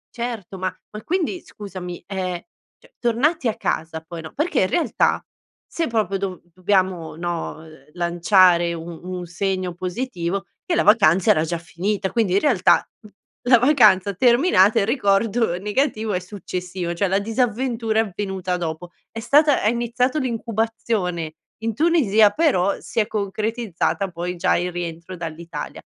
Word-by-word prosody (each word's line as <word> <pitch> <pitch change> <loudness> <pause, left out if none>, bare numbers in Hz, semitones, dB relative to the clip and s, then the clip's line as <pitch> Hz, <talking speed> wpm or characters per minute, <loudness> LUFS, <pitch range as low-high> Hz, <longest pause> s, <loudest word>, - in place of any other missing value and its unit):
Certo 230 -6 -5
ma 185 0 -1 0.2
ma 210 - -7
quindi 360 0 -1
scusami, 185 -4 -8
ehm, 185 -3 -3 0.4
cioè - - -24
tornati 255 +5 +1
a 220 - 0
casa 160 0 -2
poi 170 -1 -7
no 160 - -9
perché 305 -1 0
in 185 - +3
realtà 335 - +1 0.4
se 330 - -2
proprio 210 -4 0
do 185 -2 -4
dobbiamo 185 -4 0
no, 170 -1 -4
ehm, 155 -3 -17
lanciare 175 0 +3
un 165 0 -8
un 180 0 -5
segno 185 0 -2
positivo 185 0 -3 0.2
che 345 - -1
la - - +3
vacanza 195 -5 +5
era 155 - +3
già 170 +1 -2
finita. 190 +4 -3
Quindi 220 -6 +1
in 195 - +3
realtà, 240 -12 +3
mhmm, 215 -1 -16 0.4
la 250 - +8
vacanza 215 -7 +4
terminata, 235 - +4
il 200 - +2
ricordo 215 -3 +1
negativo 215 +2 -1
è 180 - 0
successivo, 180 -2 -5
cioè 195 +4 0
la 190 +1 +2
disavventura 225 +1 0
è - - +1
avvenuta 190 -2 -3
dopo, 170 +1 -5 0.2
è 225 - -7
stata 290 +5 +4
hai 215 - +4
iniziato 245 +4 0
l'incubazione 225 - -2 0.3
in 225 -1 -1
Tunisia 235 -9 +4
però 205 - +1
si - - -3
è 210 - +2
concretizzata 210 -2 -2
poi 175 +1 -4
già 170 - +2
il 180 +1 -2
rientro 175 +1 -6
dall'Italia. 165 0 -6
195 Hz, 155 wpm, -22 LUFS, 175-230 Hz, 0.4 s, la